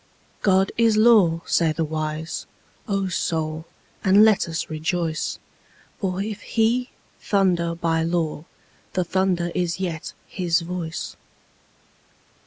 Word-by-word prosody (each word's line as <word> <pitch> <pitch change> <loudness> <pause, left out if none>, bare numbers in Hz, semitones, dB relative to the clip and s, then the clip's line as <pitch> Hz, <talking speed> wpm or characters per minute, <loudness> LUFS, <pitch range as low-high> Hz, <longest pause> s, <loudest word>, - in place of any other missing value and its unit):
God 190 -1 +3
is 225 -2 +4
law, 210 -8 +5
say 165 -2 +2
the 165 - -1
wise; 155 +1 -4 0.4
O 195 -2 0
Soul, 160 -3 -2 0.4
and 200 +3 +7
let 210 -5 +3
us 165 0 -3
rejoice, 160 +1 -2 0.6
For 190 -1 -1
if 210 -1 -5
He 240 +3 +1 0.3
thunder 175 -4 +1
by 165 -1 0
law 165 -2 -1 0.5
the 185 - +1
thunder 180 -1 0
is 175 -1 -1
yet 175 -2 -4
His 175 -3 0
voice. 170 -1 -5
175 Hz, 115 wpm, -23 LUFS, 165-195 Hz, 0.6 s, and